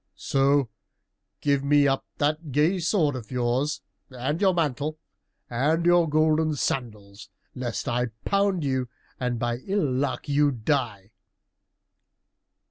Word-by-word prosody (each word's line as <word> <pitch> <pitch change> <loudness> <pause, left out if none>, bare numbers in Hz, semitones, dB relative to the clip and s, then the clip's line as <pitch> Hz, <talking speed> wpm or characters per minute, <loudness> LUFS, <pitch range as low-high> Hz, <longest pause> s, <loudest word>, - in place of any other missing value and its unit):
"So 140 0 +2 0.7
give 140 -2 +1
me 145 0 +4
up 135 0 -1
that 150 +1 -1
gay 155 +8 +2
sword 165 -4 +1
of 115 -5 -7
yours, 130 +4 -1 0.3
and 130 +6 -3
your 195 -2 +5
mantle, 155 -3 -1 0.5
and 150 +8 0
your 175 -2 +4
golden 155 0 +2
sandals, 105 -6 -4 0.2
lest 125 -3 -4
I 125 +1 0 0.2
pound 200 -4 +1
you 130 -3 -1 0.3
and 125 -1 -1
by 120 0 -1
ill 195 +7 -1
luck 130 +3 -2
you 145 0 +3
die!" 115 -5 -2
140 Hz, 125 wpm, -25 LUFS, 125-155 Hz, 0.7 s, your